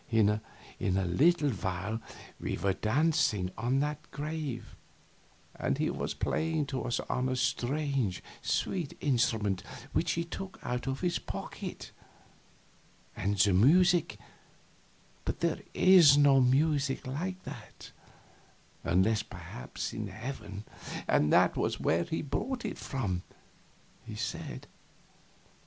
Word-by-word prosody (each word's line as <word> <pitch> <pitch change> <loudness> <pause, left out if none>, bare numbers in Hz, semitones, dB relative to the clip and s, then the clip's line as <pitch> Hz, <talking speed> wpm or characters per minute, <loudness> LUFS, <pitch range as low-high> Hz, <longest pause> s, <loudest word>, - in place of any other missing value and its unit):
In 110 -3 +4 0.5
a 95 0 +1
little 145 - +3
while 95 +2 -3 0.4
we - - -2
were 100 -1 +1
dancing 110 - +1
on 125 +5 +1
that 150 0 -3
grave, 150 -3 -5 0.8
and - - -1
he - - +1
was - - -3
playing 160 -2 0
to 135 -1 -3
us 120 - 0
on 130 +1 -1
a 130 - 0
strange, 130 -4 0 0.2
sweet 175 -7 -1
instrument 110 -8 +1 0.3
which - - +1
he 170 - 0
took 190 +3 -7
out 125 +2 -3
of 135 0 -2
his 175 -1 +1
pocket; - - -6 1.2
and 100 +2 -1
the 100 0 +5
music 175 - +5 1.1
but - - -3
there - - +1
is 175 -7 +8
no 140 -2 +6
music 135 +1 +2
like 180 +8 -4
that, 125 -5 -10 0.9
unless 95 +5 +3
perhaps 60 - -7
in 110 -1 -3
heaven, 105 -1 -6 0.4
and 75 - +3
that - - +5
was - - 0
where 85 +1 +2
he 160 - -2
brought 245 - -2
it - - -4
from, 100 -10 -2 0.8
he - - -8
said. - - -4
130 Hz, 120 wpm, -31 LUFS, 105-150 Hz, 1.2 s, is